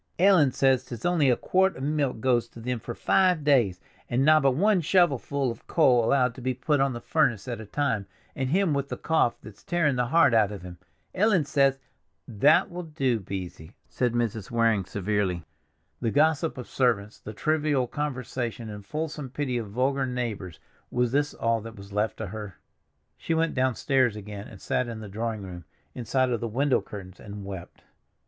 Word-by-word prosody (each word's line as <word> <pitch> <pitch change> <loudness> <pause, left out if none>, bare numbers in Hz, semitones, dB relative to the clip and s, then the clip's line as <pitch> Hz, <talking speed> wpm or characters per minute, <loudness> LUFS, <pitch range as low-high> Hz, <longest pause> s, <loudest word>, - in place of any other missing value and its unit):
Ellen 180 -7 +5
says 130 -1 +2
'tis 120 -3 -8
only 170 -6 +3
a 125 - +4
quart 190 +7 +1
of 130 - -6
milk 145 -5 -1
goes 120 -2 +2
to - - -13
them 125 +1 -3
for 120 +2 -7
five 180 -5 +2
days, 120 -11 +3 0.3
and 130 +3 +1
nobbut 150 -4 +5
one 200 +3 +3
shovelful 140 -6 +2
of 115 - -12
coal 125 -7 +4
allowed 125 0 +2
to 130 - -11
be 130 0 -1
put 145 +3 0
on 135 -1 +2
the 120 - -5
furnace 120 -8 +1
at 120 -3 -4
a 110 - -10
time, 115 -6 -1 0.3
and 130 -1 -2
him 185 +1 +2
with 140 0 -2
the - - -4
cough 160 -7 +1
that's 105 -2 -12
tearing 155 -6 +1
the 125 -1 +1
heart 140 -2 +4
out 110 -3 +4
of 100 -4 -8
him! 90 -1 -10 0.3
Ellen 190 -5 +3
says—" 140 -2 +2 0.5
"That 130 +10 +3
will 175 +1 -5
do, 135 -8 -1
Beesy," 90 -4 -7 0.2
said 125 -2 0
Mrs. 115 -4 -2
Waring 115 -4 +2
severely. 95 -4 -1 0.5
The 115 - 0
gossip 155 +4 +2
of 125 - -7
servants, 110 -5 0
the 110 - -8
trivial 150 0 +1
conversation 125 -5 -4
and 105 -1 -8
fulsome 150 +3 -4
pity 130 -2 -2
of 110 -3 -6
vulgar 130 +4 0
neighbors, 110 -9 -4 0.3
was 125 -1 0
this 145 +2 0
all 115 -1 0
that 115 +1 -9
was 100 0 -12
left 105 +2 0
to 110 - -4
her? 105 0 -7 0.6
She 165 - -2
went 165 0 +1
downstairs 130 -2 +1
again, 105 -1 -8
and 100 - -12
sat 125 - -1
in 115 -2 -6
the 110 - -8
drawing 110 +1 -3
room, 90 -3 -9 0.3
inside 125 +2 0
of 120 - 0
the 115 - -3
window 135 +5 +1
curtains, 95 -2 -10
and 100 -1 -8
wept. 95 -3 -9
125 Hz, 190 wpm, -26 LUFS, 110-145 Hz, 0.6 s, Ellen